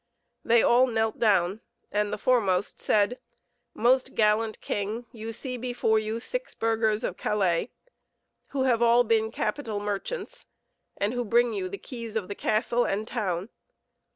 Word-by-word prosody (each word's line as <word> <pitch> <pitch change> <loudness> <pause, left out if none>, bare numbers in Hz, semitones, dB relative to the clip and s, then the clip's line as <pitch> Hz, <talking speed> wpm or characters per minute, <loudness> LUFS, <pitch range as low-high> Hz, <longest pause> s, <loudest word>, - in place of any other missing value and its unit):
They 230 0 +4
all 250 +2 +5
knelt 225 -2 -1
down, 195 -2 +2 0.3
and 210 0 0
the - - -2
foremost 205 -5 +1
said: 210 +4 +2 0.6
"Most 255 +3 +2
gallant 215 0 +2
king, 210 +4 -3
you 225 -2 -6
see 250 +3 -4
before 240 -3 +1
you 215 +1 -3
six - - -4
burghers 225 -1 +1
of - - -3
Calais, 190 -1 0 0.8
who 275 -1 -1
have 240 -3 +2
all 235 +1 +5
been 220 -1 +2
capital 220 -1 -2
merchants, 205 - -5 0.5
and 205 +3 0
who 245 0 -1
bring 235 +1 +2
you 190 -3 -3
the 200 - -5
keys 230 -2 -8
of 210 -4 -2
the - - -2
castle 235 +4 +1
and 210 +3 -2
town. 195 -5 -2
220 Hz, 155 wpm, -27 LUFS, 210-240 Hz, 0.8 s, all